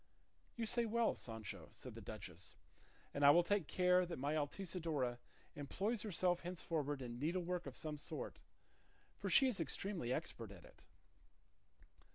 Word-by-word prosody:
"You 235 - -1
say 235 +1 +2
well, 230 +1 +3
Sancho," 110 -3 -6
said - - -9
the - - -8
duchess, - - -6 0.6
"and 140 - 0
I 140 - +10
will 175 +4 +8
take 195 -3 +1
care 180 0 +5
that 175 -1 -4
my 140 +3 0
Altisidora 155 -5 -1 0.4
employs 195 - -1
herself 180 -4 +2
henceforward 155 -5 -2
in 120 -1 -5
needlework 175 +2 0
of 130 - -6
some 150 -2 -3
sort; - - -5 0.8
for - - -1
she 270 - +8
is 245 -7 0
extremely 165 -3 -1
expert 125 -6 -2
at 95 -4 -11
it." - - -17
165 Hz, 150 wpm, -40 LUFS, 140-185 Hz, 0.8 s, I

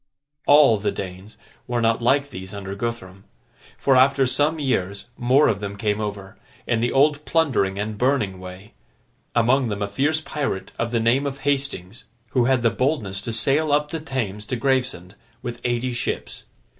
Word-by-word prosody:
All 145 -6 +7
the 105 - 0
Danes 95 +3 -8 0.3
were 120 -1 -1
not 115 0 +2
like 140 +4 +2
these 95 -3 -8
under 100 -1 -6
Guthrum; 100 -3 -5 0.5
for, 135 - +3
after 135 +1 +5
some 145 +5 +1
years, 100 -9 -1
more 130 +5 +4
of 100 - +1
them 100 -1 -5
came 105 0 -1
over, 100 -2 -6 0.3
in 115 - +1
the 120 +1 0
old 145 +2 +3
plundering 135 -13 +1
and 105 +1 -4
burning 120 -8 +1
way—among 105 - -3
them 100 -1 -2
a - - -1
fierce 145 +10 0
pirate 145 -10 -4
of 115 - 0
the 115 0 0
name 120 +5 +2
of 140 0 -6
Hastings, 135 -6 -2 0.3
who 125 -2 +2
had 130 -1 +2
the 115 - +4
boldness 115 -7 -1
to 115 - -4
sail 135 +7 +1
up 150 +1 +1
the 165 - -3
Thames 115 -9 -4
to - - -2
Gravesend, 125 -8 -1 0.3
with 120 -1 -6
eighty 120 +1 -1
ships. 120 - -3
120 Hz, 170 wpm, -23 LUFS, 100-135 Hz, 0.5 s, All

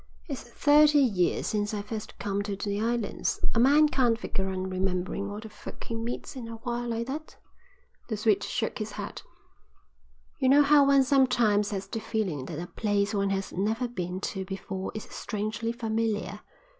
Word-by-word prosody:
"It's 280 -5 -4
thirty 295 +4 +5
years 205 -11 +2
since 210 0 -1
I 205 - -3
first 215 0 -6
come 200 0 -1
to 205 -1 -3
the 205 +1 -2
islands. 230 -1 -1
A - - +2
man 290 +5 +6
can't 245 -6 +2
figure 190 -4 -2
on 185 0 -2
remembering 185 +1 -1
all 205 +1 -5
the 220 - -8
folk 210 -1 -10
he 230 - -5
meets 230 +4 -4
in 245 -3 -6
a 230 - -6
while 240 +1 -3
like 230 0 -1
that." 300 +5 -6 0.7
The 220 - -2
Swede 215 -1 +2
shook 225 -3 -2
his 215 0 -4
head. - - -6 1.2
"You 260 -2 +3
know 285 +2 +7
how 285 -1 +6
one 275 -1 +6
sometimes 240 -7 +3
has 195 -2 -3
the 210 +3 -4
feeling 215 - -2
that 150 - -6
a 170 - -4
place 205 +1 0
one 200 -1 +1
has 195 0 -2
never 220 +6 0
been 180 -5 -4
to 190 -1 -3
before 190 0 -5
is 215 - -4
strangely 215 +1 -3
familiar. 220 -4 -1
220 Hz, 180 wpm, -28 LUFS, 200-240 Hz, 1.2 s, know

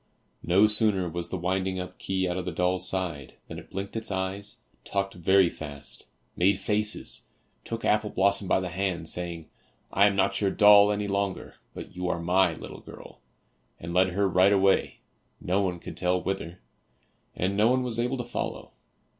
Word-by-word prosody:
No 95 +5 +4
sooner 105 -4 +1
was 85 +1 -4
the 95 - -3
winding 95 +1 -1
up 90 0 -7
key 95 -1 -1
out 90 - -2
of 90 -1 -4
the 90 - -3
doll's 90 +2 0
side 85 -8 -4
than - - -7
it - - -15
blinked 100 +2 -6
its 115 0 -2
eyes, 95 +1 -4 0.2
talked 100 -1 -2
very 95 +2 +4
fast, 70 -4 -7 0.3
made 95 +2 +3
faces, 105 +1 -1 0.4
took 115 0 -5
Apple 105 0 +2
blossom 100 0 +1
by - - +3
the 90 -1 -4
hand, 90 -2 -2
saying, 85 -2 -3 0.5
"I 100 - +5
am 100 - 0
not 100 +1 +1
your 100 - +2
doll 105 0 +7
any 105 0 -2
longer, 100 -1 -3 0.2
but - - -9
you 90 0 -2
are 85 - -1
my 90 0 +2
little - - -9
girl," - - -13 0.6
and 85 +1 -6
led 95 +1 +4
her 100 +1 +2
right 95 +1 +4
away 95 -1 +2 0.4
no 95 +3 0
one 90 -3 -1
could - - -9
tell 90 0 +1
whither, 90 -2 -4 0.8
and 95 +2 -1
no 105 +2 +4
one 130 0 +2
was 120 -2 -2
able 125 +3 0
to 120 - -3
follow. 120 - -5
95 Hz, 185 wpm, -27 LUFS, 90-100 Hz, 0.8 s, doll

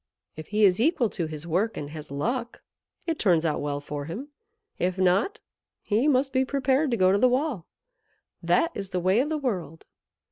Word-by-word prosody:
If 155 0 -9
he 210 0 +3
is 185 0 +4
equal 250 -4 +2
to 170 -5 -3
his 155 0 -7
work, 190 +7 0
and 145 0 -5
has 155 -1 -8
luck, 235 - -3 0.4
it 325 -2 -2
turns 170 -5 +3
out 155 - 0
well 145 -1 -2
for 145 0 -6
him; 225 - -6 0.5
if 185 +1 0
not, 190 - +2 0.5
he 225 +7 +2
must 270 -1 +2
be 260 0 +3
prepared 270 +2 +1
to 235 - 0
go 185 -1 +4
to 200 - +3
the 255 - +5
wall. 255 - -1 0.7
That 335 - +2
is 195 -2 -6
the 185 - -1
way 185 +5 +3
of 280 +4 +1
the 315 - -1
world." 185 - -4
205 Hz, 200 wpm, -26 LUFS, 165-260 Hz, 0.7 s, the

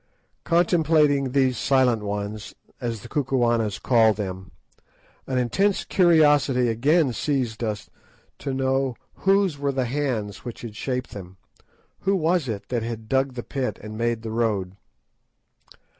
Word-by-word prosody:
Contemplating 160 -5 +3
these 130 -3 +2
"Silent 130 -5 +3
Ones," 105 +1 -5 0.2
as 115 -5 -4
the - - -9
Kukuanas 120 -7 0
call 115 -3 +4
them, 95 -3 -6 0.8
an 130 - -1
intense 190 - +1
curiosity 145 -8 +4
again 140 +5 +2
seized 125 -5 -2
us 105 -2 -3 0.5
to 140 - -4
know 130 -1 0 0.2
whose 195 -6 +1
were 140 0 0
the 130 -2 -1
hands 120 -6 -2
which 120 -2 -7
had 115 -3 -8
shaped 125 +2 -3
them, 95 -2 -10 0.6
who 195 - 0
it - - +3
was 170 -2 +1
that 110 +2 -3
had 115 -1 -5
dug 135 -1 +1
the 120 - -5
pit 135 -2 -3
and 110 0 -7
made 115 0 -1
the 110 - -5
road. 105 -5 -1
125 Hz, 140 wpm, -24 LUFS, 110-140 Hz, 0.8 s, call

